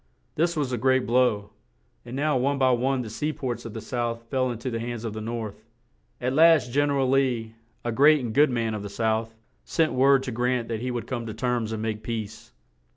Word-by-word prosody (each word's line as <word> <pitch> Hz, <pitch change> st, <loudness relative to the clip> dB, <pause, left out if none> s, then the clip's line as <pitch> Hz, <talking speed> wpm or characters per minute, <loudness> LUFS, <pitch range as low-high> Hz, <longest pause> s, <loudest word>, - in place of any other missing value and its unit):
This 170 Hz, +1 st, 0 dB
was 140 Hz, -4 st, -1 dB
a 125 Hz, -, -1 dB
great 130 Hz, +1 st, +2 dB
blow, 115 Hz, -4 st, +2 dB, 0.5 s
and 120 Hz, +1 st, -8 dB
now 150 Hz, +1 st, +1 dB
one 135 Hz, +3 st, +1 dB
by 130 Hz, -1 st, +4 dB
one 125 Hz, +1 st, +1 dB
the 110 Hz, -, -7 dB
sea 150 Hz, +7 st, -2 dB
ports 130 Hz, -5 st, -4 dB
of 115 Hz, -, -7 dB
the 110 Hz, -, -5 dB
South 120 Hz, -1 st, -3 dB
fell 130 Hz, -2 st, +1 dB
in 120 Hz, -, -4 dB
to 125 Hz, +3 st, -4 dB
the 115 Hz, -, -2 dB
hands 120 Hz, -1 st, -5 dB
of 110 Hz, -, -3 dB
the 110 Hz, -, -5 dB
North. 110 Hz, -2 st, -5 dB, 0.6 s
At 125 Hz, +1 st, -1 dB
last 160 Hz, -4 st, +5 dB
Gen 145 Hz, +3 st, +2 dB
er 140 Hz, -, +1 dB
al 135 Hz, -1 st, +2 dB
Lee, 125 Hz, -5 st, +1 dB, 0.3 s
a 120 Hz, -, 0 dB
great 145 Hz, +6 st, +5 dB
and 110 Hz, -, -4 dB
good 145 Hz, +3 st, +5 dB
man 115 Hz, -3 st, -1 dB
of 105 Hz, -, -4 dB
the 100 Hz, -, -6 dB
South, 110 Hz, +1 st, -1 dB, 0.3 s
sent 160 Hz, -1 st, +1 dB
word 135 Hz, +1 st, +4 dB
to 130 Hz, -, -4 dB
Grant 125 Hz, 0 st, -1 dB
that 115 Hz, -1 st, -3 dB
he 125 Hz, -, -2 dB
would 120 Hz, -2 st, -3 dB
come 120 Hz, -3 st, -4 dB
to 110 Hz, -, -6 dB
terms 120 Hz, -2 st, -1 dB
and 110 Hz, -1 st, -3 dB
make 110 Hz, -1 st, -3 dB
peace. 110 Hz, -2 st, -6 dB
120 Hz, 235 wpm, -26 LUFS, 115-135 Hz, 0.6 s, last